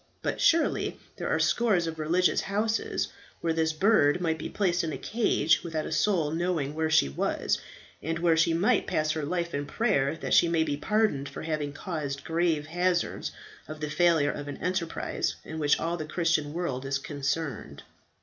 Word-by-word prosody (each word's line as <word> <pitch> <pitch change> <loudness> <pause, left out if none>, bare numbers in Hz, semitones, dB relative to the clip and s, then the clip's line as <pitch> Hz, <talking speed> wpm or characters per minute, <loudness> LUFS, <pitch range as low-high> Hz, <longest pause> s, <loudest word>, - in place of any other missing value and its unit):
But - - -2
surely 335 0 +2 0.2
there - - -3
are - - +2
scores 210 -8 +2
of 160 -1 -5
religious 175 +4 +2
houses, 215 +3 -1 0.3
where 165 -1 0
this 160 0 +1
bird 155 -3 +3
might 160 -2 -1
be - - -5
placed 180 -4 +1
in 160 - -2
a - - -4
cage 215 -8 +2
without 160 -3 -3
a - - -5
soul 170 -8 +1
knowing 165 -4 -1
where 160 0 -1
she 155 - +4
was, 70 - -1 0.4
and 165 +1 -2
where 170 -1 +3
she 165 +1 +3
might 200 +8 +2
pass 155 -4 +1
her 155 - -2
life 170 +2 -2
in 145 0 -2
prayer 160 - +1
that - - -3
she 170 - +6
may 165 -1 +2
be 145 -2 -1
pardoned 190 -5 0
for - - -8
having 155 -2 -2
caused 145 -3 -4
grave 165 -2 0
hazards 175 +2 -1 0.4
of 155 +1 -8
the 150 -1 -4
failure 165 -3 +3
of 145 0 -7
an 145 - -6
enterprise 180 -2 -2
in 160 - -6
which 145 -1 +3
all 170 +1 -1
the 155 - -4
Christian 165 -3 0
world 150 -6 -3
is 135 0 -1
concerned." 140 - -4
160 Hz, 190 wpm, -28 LUFS, 150-175 Hz, 0.4 s, she